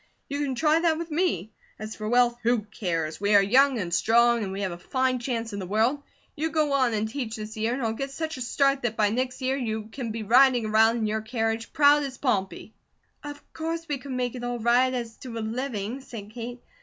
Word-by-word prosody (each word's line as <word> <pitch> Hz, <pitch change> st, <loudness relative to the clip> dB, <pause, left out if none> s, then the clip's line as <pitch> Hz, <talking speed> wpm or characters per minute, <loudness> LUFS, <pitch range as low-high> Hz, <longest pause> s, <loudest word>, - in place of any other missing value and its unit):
You 285 Hz, +1 st, -3 dB
can 275 Hz, -3 st, -1 dB
try 310 Hz, +5 st, +3 dB
that 330 Hz, -2 st, +2 dB
with 335 Hz, 0 st, -6 dB
me. 300 Hz, -, 0 dB, 0.3 s
As 215 Hz, +1 st, -7 dB
for 215 Hz, 0 st, -4 dB
wealth, 245 Hz, 0 st, +4 dB
who 240 Hz, -1 st, +2 dB
cares? 170 Hz, -6 st, -3 dB
We 205 Hz, +1 st, +3 dB
are 200 Hz, -, +7 dB
young 260 Hz, +6 st, +4 dB
and 180 Hz, -5 st, -3 dB
strong, 235 Hz, +5 st, +4 dB
and 190 Hz, -, -4 dB
we 195 Hz, +1 st, -4 dB
have 190 Hz, -2 st, -1 dB
a 170 Hz, -, -6 dB
fine 260 Hz, +4 st, 0 dB
chance 235 Hz, -3 st, -3 dB
in 200 Hz, -, -4 dB
the 185 Hz, -, -5 dB
world. 225 Hz, +8 st, +1 dB, 0.3 s
You 315 Hz, +2 st, -1 dB
go 305 Hz, -3 st, +1 dB
on 255 Hz, -5 st, +2 dB
and 215 Hz, +1 st, 0 dB
teach 230 Hz, -2 st, -4 dB
this 215 Hz, 0 st, -7 dB
year, 220 Hz, +2 st, 0 dB
and 265 Hz, -, -4 dB
I'll 220 Hz, -1 st, 0 dB
get 275 Hz, +4 st, -4 dB
such 315 Hz, +3 st, -4 dB
a -, -, -7 dB
start 275 Hz, +2 st, +1 dB
that 235 Hz, -2 st, -2 dB
by 210 Hz, -1 st, +3 dB
next 255 Hz, +2 st, -2 dB
year 260 Hz, +1 st, +1 dB
you 220 Hz, -4 st, -3 dB
can 245 Hz, -1 st, -5 dB
be 220 Hz, 0 st, -4 dB
riding 245 Hz, +1 st, +5 dB
around 220 Hz, +2 st, +4 dB
in 225 Hz, -, -1 dB
your 215 Hz, +1 st, -1 dB
carriage, 225 Hz, 0 st, -2 dB
proud 295 Hz, -1 st, +5 dB
as 275 Hz, -2 st, -5 dB
Pompey." 215 Hz, -3 st, -2 dB, 0.5 s
"Of 290 Hz, 0 st, -8 dB
course 330 Hz, +1 st, -4 dB
we 290 Hz, -2 st, -2 dB
could 270 Hz, 0 st, -7 dB
make 250 Hz, -1 st, -1 dB
it 245 Hz, -1 st, -7 dB
all 245 Hz, 0 st, -2 dB
right, 240 Hz, +3 st, +3 dB
as 235 Hz, -3 st, -4 dB
to 240 Hz, -3 st, -8 dB
a -, -, -2 dB
living," 235 Hz, 0 st, -3 dB
said 215 Hz, -5 st, -9 dB
Kate. 240 Hz, +1 st, -7 dB
240 Hz, 240 wpm, -26 LUFS, 220-270 Hz, 0.5 s, are